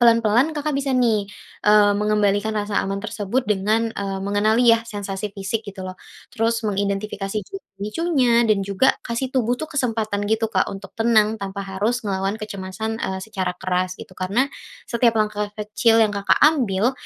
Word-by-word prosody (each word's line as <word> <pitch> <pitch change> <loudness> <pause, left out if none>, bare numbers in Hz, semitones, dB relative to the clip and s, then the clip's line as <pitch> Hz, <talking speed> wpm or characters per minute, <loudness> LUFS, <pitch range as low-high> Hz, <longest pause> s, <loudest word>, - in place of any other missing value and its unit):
pelan-pelan 235 +4 +4
Kakak 300 0 -1
bisa 275 -1 -1
nih, 225 -5 +2 0.4
eee, 210 -1 +6
mengembalikan 210 0 +1
rasa 205 -1 0
aman 195 +1 -3
tersebut 215 +4 -2
dengan, 215 +3 +1
eee, 195 -1 -3
mengenali 215 +4 +2
ya 230 - +3
sensasi 205 -2 -4
fisik 200 +3 -3
gitu 200 -2 -9
loh, 185 - -8 0.4
terus 230 0 0
mengidentifikasi 200 0 -2
juga 390 - -8 0.2
pemicunya 240 0 +2
dan 205 -2 +3
juga 200 +6 +3
kasih 235 +2 -2
tubuh 245 -2 +1
tuh 315 +4 -5
kesempatan 220 -6 -1
gitu 220 0 +1
Kak 185 - +2
untuk 195 0 -8
tenang 220 -1 +3
tanpa 200 0 -5
harus 210 +5 -1
ngelawan 195 +1 -1
kecemasan, 215 +1 -5
eee, 190 0 -3
secara 190 -5 -3
keras 185 0 -1
gitu. - - -11
Karena 200 +9 0 0.4
setiap 235 -1 +2
langkah 210 -1 0
kecil 215 +2 +2
yang 210 - -1
Kakak 200 0 +3
ambil 245 -7 +3
210 Hz, 160 wpm, -22 LUFS, 195-230 Hz, 0.4 s, eee